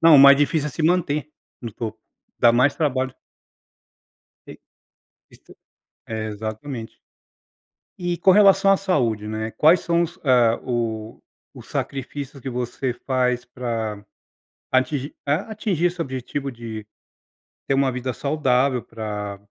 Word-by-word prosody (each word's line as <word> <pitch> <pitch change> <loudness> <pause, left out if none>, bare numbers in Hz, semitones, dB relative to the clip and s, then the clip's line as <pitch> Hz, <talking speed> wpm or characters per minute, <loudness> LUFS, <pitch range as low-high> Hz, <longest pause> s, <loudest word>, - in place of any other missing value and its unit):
não, 165 -2 +8
o - - +8
mais 140 +1 +10
difícil 145 +1 +1
é - - -7
se 155 - -4
manter 155 -3 +1 0.3
no 115 - -6
topo. 110 +1 -5 0.4
Dá 120 - +6
mais 130 +4 +3
trabalho 130 -4 -1 1.3
E - - -11 0.7
isto - - -18 0.5
é, 110 -1 -4
exatamente. 110 +3 -6 1.0
E 175 -1 -2
com 190 +3 +5
relação 195 0 +6
à 195 - +5
saúde, 115 - 0
né, 110 +1 -3
quais 160 +8 +5
são 170 0 +1
os 175 +2 -6
ah 120 -4 +4
o 115 -3 -3 0.3
os - - -13
sacrifícios 140 +1 -5
que 130 - -4
você 125 +1 -3
faz 125 0 0
pra 115 -4 -4 0.7
atingir 135 +2 0
a 150 +9 0
atingir 200 -6 -1
esse 175 0 0
objetivo 135 0 -4
de 115 -3 -7 0.8
ter - - +2
uma 135 -1 +2
vida 125 0 -3
saudável 135 -3 +1
pra 105 -2 -5
130 Hz, 135 wpm, -23 LUFS, 115-150 Hz, 1.3 s, mais